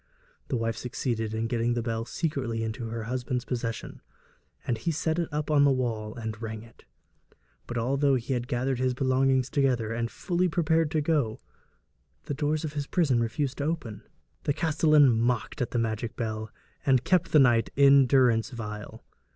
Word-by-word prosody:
The - - -1
wife 115 -1 -2
succeeded 115 -3 -3
in 110 +1 -2
getting 120 0 0
the 120 - -1
bell 115 -1 -2
secretly 130 -7 -2
into 115 +1 -4
her 115 0 -4
husband's 125 +1 -3
possession, 115 -2 -4 0.6
and 115 -3 -1
he 140 - -2
set 160 +1 0
it 170 - -1
up 150 +1 -2
on 145 -2 +5
the 140 - +5
wall 115 -5 -1
and 110 -2 -6
rang 110 -1 -5
it. 115 -1 -19 0.8
But 120 - -4
although 135 +4 +2
he 125 +2 -2
had 120 -1 -2
gathered 125 +1 -1
his 130 -1 +1
belongings 130 0 +2
together 125 -5 0
and 115 0 -1
was - - -19
fully 180 0 0
prepared 160 -1 +2
to 155 -1 0
go, 145 -8 0 0.8
the - - -4
doors 150 +2 -1
of 150 - -5
his 145 -1 -3
prison 140 -9 +2
refused 130 +5 -2
to 140 - -1
open. 150 -10 -3 0.4
The 145 - +2
castellan 155 -3 +4
mocked 120 +1 0
at 125 - 0
the - - -2
magical 110 0 -2
bell, 110 -2 -3 0.3
and 130 -2 +3
kept 185 +1 +2
the - - +5
knight 120 -5 +4
in 140 -1 +6
durance 125 -3 +3
vile. 105 -4 -7
125 Hz, 185 wpm, -27 LUFS, 115-145 Hz, 0.8 s, in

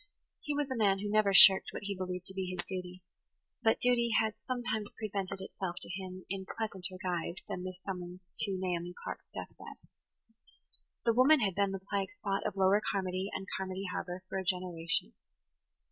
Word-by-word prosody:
He 295 - -3
was 290 -1 0
a - - 0
man 200 -4 +3
who 205 +1 -3
never 215 -2 +4
shirked 190 0 +10
what - - -6
he 200 0 -3
believed 180 -1 -4
to 190 - -9
be 190 -1 -3
his 180 0 -4
duty; 180 -1 -6 0.6
but 225 -1 +3
duty 240 -1 +3
had 220 -1 +1
sometimes 240 -5 -2
presented 195 -3 -3
itself 190 -2 -4
to - - -10
him 185 0 -6
in 190 0 -4
pleasanter 190 -4 -4
guise 175 -2 -2
than 180 - -4
this 185 -1 -5
summons 180 -1 -6
to 195 -2 0
Naomi 175 -1 -2
Clark's - - -6
death - - -7
bed. - - -11 1.2
The 230 - +4
woman 265 +4 +6
had 195 -3 +1
been 200 +2 +2
the 190 -1 -6
plague 195 -2 -1
spot 195 0 -2
of - - -4
Lower 195 +2 +4
Carmody 190 0 -1
and 190 - -4
Carmody 190 0 -3
Harbour 180 0 -4
for 190 - -3
a - - -3
generation. 175 - -1
190 Hz, 185 wpm, -32 LUFS, 180-205 Hz, 1.2 s, shirked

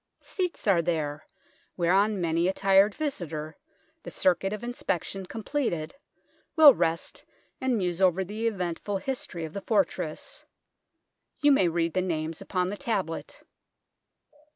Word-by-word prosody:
Seats 365 -3 -3
are 185 -4 +5
there, 155 -3 -2 0.5
whereon 195 +4 +2
many 170 0 +1
a 190 - +1
tired 195 +1 +4
visitor, 160 - -4 0.5
the - - -8
circuit 190 +1 +1
of 210 +2 -5
inspection 195 -5 -3
com 225 +3 -7
pleted, 175 - -2 0.6
will 310 -4 +10
rest 165 -3 -2 0.4
and 260 -2 +1
muse 180 -2 -1
over 190 0 +3
the 215 +5 -3
eventful 195 -1 -2
history 190 -8 -4
of 155 - -9
the 200 - -5
fortress. 190 -7 -1 1.0
You 290 0 +6
may 195 -10 +4
read 165 -1 0
the 185 - +1
names 160 -3 -3
upon 180 -1 -1
the 205 - -5
tablet. 190 -9 -3
185 Hz, 135 wpm, -27 LUFS, 170-210 Hz, 1.0 s, will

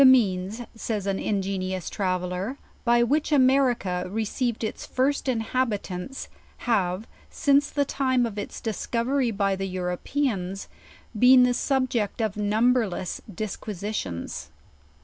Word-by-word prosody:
"The - - +9
means," 210 -4 +4
says 220 -3 -3
an 195 -1 0
ingenious 190 -3 -2
traveller, 185 +4 -2 0.3
"by 240 -1 +4
which 295 +6 +1
A 295 - +5
merica 250 -9 +3
received 225 +3 -1
its 220 - -3
first 270 +1 0
Inhabitants, 225 -2 -2 0.4
have, 195 -3 +1 0.2
since 285 0 +3
the 285 -1 +1
time 260 -3 +1
of 210 -3 -4
its 205 - -6
discovery 235 +4 0
by 200 -2 +1
the 195 0 -3
Europeans, 185 +2 -2 0.5
been 250 +1 +8
the 250 0 +4
subject 255 -5 0
of 220 -3 0
number 220 +3 +3
less 180 0 -4
disquisitions. 200 - -4
220 Hz, 125 wpm, -26 LUFS, 190-255 Hz, 0.5 s, The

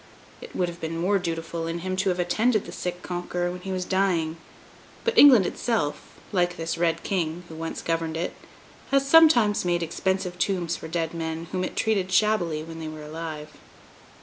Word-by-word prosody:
It 480 - -11
would 180 - +1
have 170 0 -8
been 165 0 -3
more 195 +4 +2
dutiful 165 -1 -3
in 170 +1 -3
him 185 0 -1
to 190 +1 +1
have 180 - 0
attended 215 +5 +1
the - - -8
sick 180 0 -5
Conqueror 175 0 -2
when 180 0 -7
he 190 - -5
was 185 -1 -2
dying; 175 -5 +1 0.7
but 465 0 0
England 265 - +8
itself, 200 -8 -2 0.2
like 175 -3 +1
this 165 0 -2
Red 165 -1 0
King, 175 -3 -2
who - - -9
once 165 +1 -5
governed 165 -1 -1
it, 170 - -2 0.6
has 275 0 +2
sometimes 275 -10 +6
made 175 -1 +1
expensive 180 +2 -2
tombs 175 -3 0
for 160 - -8
dead 165 0 -2
men 165 0 -4
whom 185 -1 -1
it - - -4
treated 195 -4 0
shabbily 180 -7 +2
when 165 0 -9
they 160 - -5
were 155 -1 -7
alive. 155 0 -6
175 Hz, 190 wpm, -25 LUFS, 165-190 Hz, 0.7 s, England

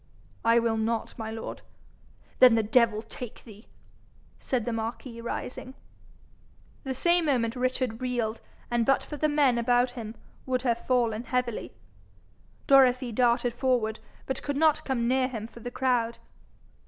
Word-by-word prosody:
'I 230 +1 +4
will 230 -1 0
not, 225 +1 -2
my 220 0 -4
lord.' 225 0 -6 0.8
'Then 250 -3 +8
the 225 - +2
devil 225 0 +3
take 235 +1 -9
thee!' 215 -1 -14 0.7
said 245 -4 -2
the 240 - -2
marquis, 230 +1 -5
rising. 250 +2 -6 1.1
The 265 -2 -3
same 345 +5 +2
moment 245 -5 +1
Richard 255 -2 -1
reeled, 240 -3 -2 0.3
and 240 -1 +2
but 270 +4 +2
for 300 - -7
the 305 +2 +1
men 280 -5 +3
about 245 +1 +2
him, 230 -2 -7 0.3
would 255 -1 0
have 235 -2 -1
fallen 235 -2 +1
heavily. 245 -1 -2 0.9
Dorothy 255 -3 +5
darted 240 +1 +2
forward, 240 -3 0 0.3
but 265 - -3
could 285 -1 -3
not 310 0 +3
come 240 -3 0
near 255 +1 +2
him 225 -4 -5
for 235 - -12
the 245 - -6
crowd. 245 -2 0
245 Hz, 150 wpm, -27 LUFS, 230-260 Hz, 1.1 s, Then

